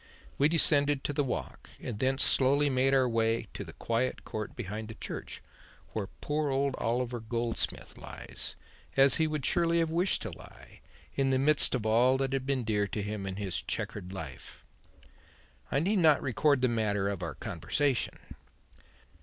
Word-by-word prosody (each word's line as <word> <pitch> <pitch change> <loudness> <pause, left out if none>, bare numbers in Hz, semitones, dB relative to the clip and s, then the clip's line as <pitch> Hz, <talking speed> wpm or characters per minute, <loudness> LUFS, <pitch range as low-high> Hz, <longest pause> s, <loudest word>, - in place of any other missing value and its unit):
We 145 +2 +5
descended 145 -3 +4
to 145 - -2
the 145 - +1
Walk 100 - -5
and 110 -4 -6
thence 130 +2 +3
slowly 140 +2 +3
made 130 +1 +2
our 135 -2 +4
way 115 -1 +1
to - - -5
the 80 -4 -11
quiet 115 +3 -2
court 110 -1 -5
behind 105 +3 -5
the 110 - -8
church, - - -7 0.5
where 105 -3 -2
poor 150 0 -1
old 135 0 +1
Oliver 120 +1 -1
Goldsmith 115 +1 -2
lies, - - -7 0.4
as 135 -1 +6
he 160 - +2
would 150 -3 -3
surely 170 -1 +2
have 165 -1 +1
wished 175 +4 +2
to - - -5
lie, - - -14 0.3
in 135 -1 +1
the 130 - +3
midst 140 0 +4
of 115 -4 -3
all 120 +4 +4
that 135 0 -1
had 135 -1 -2
been 135 -3 0
dear 105 -2 0
to 105 +1 -4
him 105 -1 -4
in 95 - -3
his 100 -2 -2
chequered 95 -3 -4
life. 80 -9 -9 1.1
I 140 - +2
need 195 +6 +1
not 155 -4 +5
record 140 +2 +2
the 130 - +4
matter 105 -4 0
of 100 -2 -3
our 85 - -4
conversation. 135 - -1
130 Hz, 175 wpm, -30 LUFS, 110-140 Hz, 1.1 s, as